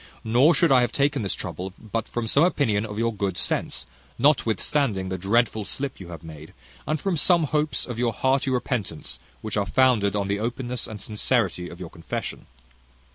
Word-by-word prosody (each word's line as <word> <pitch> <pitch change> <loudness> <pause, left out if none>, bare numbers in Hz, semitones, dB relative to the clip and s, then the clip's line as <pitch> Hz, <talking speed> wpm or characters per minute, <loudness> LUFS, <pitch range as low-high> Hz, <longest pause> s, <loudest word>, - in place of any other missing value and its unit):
Nor 125 +9 +5
should 170 -4 +3
I 130 -2 +6
have 120 -2 +1
taken 140 0 +1
this 100 -4 -2
trouble, 95 +1 -6
but 115 0 -4
from 120 -1 -3
some 140 +7 +4
opinion 110 - +2
of 105 -1 -7
your 115 +1 +1
good 100 -3 -2
sense, - - -1 0.3
notwithstanding 120 -5 +2
the 95 - -2
dreadful 110 +3 +2
slip 135 +6 -3
you 95 - -9
have 85 -1 -9
made; 80 -1 -11 0.3
and 155 0 0
from 195 +1 0
some 170 +2 +4
hopes 150 0 0
of 120 -2 -6
your 120 -1 +2
hearty 135 +3 +1
repentance, 120 - -2 0.2
which 110 -1 -3
are 100 -2 0
founded 110 -3 +3
on 100 -1 0
the 100 +1 0
openness 120 +2 -2
and 110 -1 -7
sincerity 95 -4 0
of 85 - -11
your 90 -3 -7
confession. 85 - -5
115 Hz, 185 wpm, -25 LUFS, 100-135 Hz, 0.3 s, I